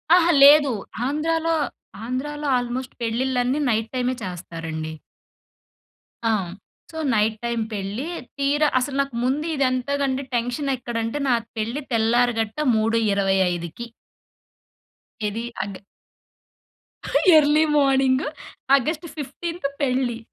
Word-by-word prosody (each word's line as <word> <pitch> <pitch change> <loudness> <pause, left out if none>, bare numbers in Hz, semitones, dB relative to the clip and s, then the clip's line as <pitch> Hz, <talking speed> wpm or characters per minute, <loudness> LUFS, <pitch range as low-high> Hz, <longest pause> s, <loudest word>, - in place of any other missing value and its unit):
ఆహా! 345 -1 +4
లేదు 285 -1 +8 0.4
ఆంధ్రాలో 325 +3 0 0.5
ఆంధ్రాలో 295 +4 -3
ఆల్మోస్ట్ 245 +1 -4
పెళ్ళిళ్ళన్నీ 250 +3 0
నైట్ 225 -1 0
టైమే 250 0 0
చేస్తారండి 165 -3 -5 1.3
ఆ! 225 - +3 0.6
సో, 320 - -9 0.2
నైట్ 215 +1 +2
టైమ్ 235 -1 -1
పెళ్లి 205 +7 -4 0.3
తీరా 285 +2 +2
అసలు 265 +2 -3
నాకు 275 -3 -4
ముందు 280 +5 0 0.2
ఇంతకంటే 270 +1 -1
టెన్షన్ 245 +4 -1
ఎక్కడంటే 235 0 -3
నా - - +4 0.2
పెళ్లి 230 +7 -2
తెల్లారి 235 +2 +3
గట్ట 220 +3 -5 0.2
3:25కి. 200 -3 +1 1.4
ఏది 215 +3 -2 0.2
అగ్ 200 -1 -6 1.6
ఎర్లీ 300 +1 +5
మార్నింగు 270 0 +3 0.5
ఆగస్ట్ 310 +5 -2
15థ్ 335 +2 -4
పెళ్లి. 255 -3 0
250 Hz, 95 wpm, -23 LUFS, 225-285 Hz, 1.6 s, లేదు